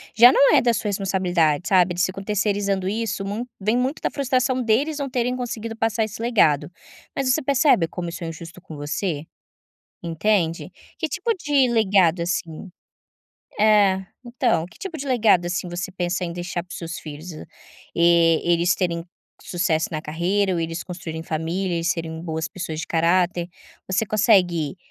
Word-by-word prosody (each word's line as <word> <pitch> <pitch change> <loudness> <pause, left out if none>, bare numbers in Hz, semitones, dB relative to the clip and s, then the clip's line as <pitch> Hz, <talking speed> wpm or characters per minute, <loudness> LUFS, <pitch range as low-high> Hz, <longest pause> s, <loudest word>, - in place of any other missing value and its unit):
já 240 +2 +9
não 280 +2 +5
é 265 - +6
da 240 -1 +2
sua 210 0 -2
responsabilidade, 180 -5 +1
sabe, 185 -2 +4
eles 180 +1 +1
ficam 195 +1 -5
terceirizando 200 -2 0
isso, 210 -2 -2
mu 215 +5 -3
vem 215 +4 +1
muito 260 +4 -1
da - - -1
frustração 255 -2 0
deles 285 +7 +1
não 275 -1 -3
terem 250 0 -1
conseguido 230 -2 -5
passar 225 0 0
esse 215 +1 -8
legado, 180 - +2 0.4
mas 270 -2 +1
você 315 - +1
percebe 265 - +3
como 175 0 -5
isso 170 - -7
é - - -3
injusto 165 +2 -9
com 160 -4 -10
você? 150 +1 -3 0.8
Entende? 170 0 0 0.3
Que 320 - -1
tipo 385 - -1
de 285 -4 +2
legado, 190 -6 +3
assim 170 +1 -3 0.9
é 205 -3 +4 0.2
então, 235 -9 0
que - - -19
tipo 360 -5 -6
de 280 - -5
legado, 215 -9 +3
assim, 180 0 -2
você 175 +2 -4
pensa 180 0 -2
em 170 - -4
deixar 175 0 -4
para 180 - -25
os - - -6
seus 165 0 -6
filhos? 155 +3 -8 0.6
Eh, 170 -1 +4
eles 170 0 +3
terem 170 -2 -1 0.4
sucesso 165 -3 0
na 155 -2 -3
carreira 185 +6 0
ou 170 - -1
eles 165 +1 -3
construírem 165 -3 -6
família 170 +3 -2
e 165 - -5
serem 165 -2 -2
boas 160 -1 -3
pessoas 165 -4 -5
de - - -5
caráter? 175 +1 +1 0.4
Você 200 +3 +1
consegue 185 - +2
185 Hz, 170 wpm, -23 LUFS, 170-225 Hz, 0.9 s, já